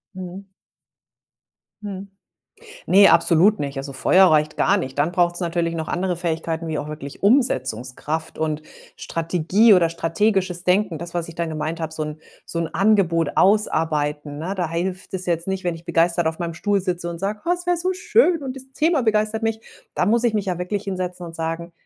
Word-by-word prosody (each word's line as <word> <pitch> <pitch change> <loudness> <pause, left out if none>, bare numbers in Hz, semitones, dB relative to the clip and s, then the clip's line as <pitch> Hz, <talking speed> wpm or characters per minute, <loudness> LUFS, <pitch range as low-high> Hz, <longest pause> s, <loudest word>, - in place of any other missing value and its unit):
Mhm. 185 +1 -8 1.3
Mhm. 200 -1 -7 0.8
Ne, 200 +1 +7
absolut 185 +6 +4
nicht. 140 -1 -4
Also, 140 +1 -5
Feuer 185 +8 +5
reicht 155 -2 +2
gar 200 - +3
nicht. 135 -8 -5
Dann 155 +4 +1
braucht's 175 0 +2
natürlich 170 -1 -1
noch 160 -1 -4
andere 180 0 -1
Fähigkeiten, 165 -1 -3
wie 155 -2 -2
auch 145 - -5
wirklich 150 -2 -8
Umsetzungskraft 155 - 0
und 155 -1 -2 0.3
Strategie 180 +6 +2
oder 180 -4 +5
strategisches 180 +2 0
Denken. 185 -2 +1
Das, 170 +2 -8
was 170 -1 -2
ich 165 - -9
dann 170 -1 -2
gemeint 155 +1 -4
habe, 160 -1 -4
so 155 - -3
'n 150 0 -6 0.2
so 170 - -5
'n 165 -1 -1
Angebot 170 -4 +2
ausarbeiten, 150 -7 +1
ne? 175 +6 -3
Da 175 -4 -2
hilft 180 +3 -4
es 185 -1 -3
jetzt 170 0 -1
nicht, 190 -1 -3
wenn 175 -1 0
ich 165 +1 -13
begeistert 170 0 +2
auf 160 0 -1
meinem 170 -2 -4
Stuhl 200 +4 0
sitze 180 -2 -3
und 170 -1 -6
sage: 205 +3 -3
„Ach, 350 - +3
es 355 0 -7
wär 355 0 +2
so 365 +2 0
schön 360 -4 +2
und 260 -2 -5
das 265 - -8
Thema 315 -2 +2
begeistert 215 0 +1
mich.“ 225 0 -1 0.3
Da - - +1
muss 235 +5 +2
ich 225 -2 +2
mich 210 - 0
ja 180 -2 -2
wirklich 195 +3 -3
hinsetzen 180 -2 -4
und 165 -1 -9
sagen: 165 +1 -4
175 Hz, 195 wpm, -22 LUFS, 160-200 Hz, 1.3 s, Ne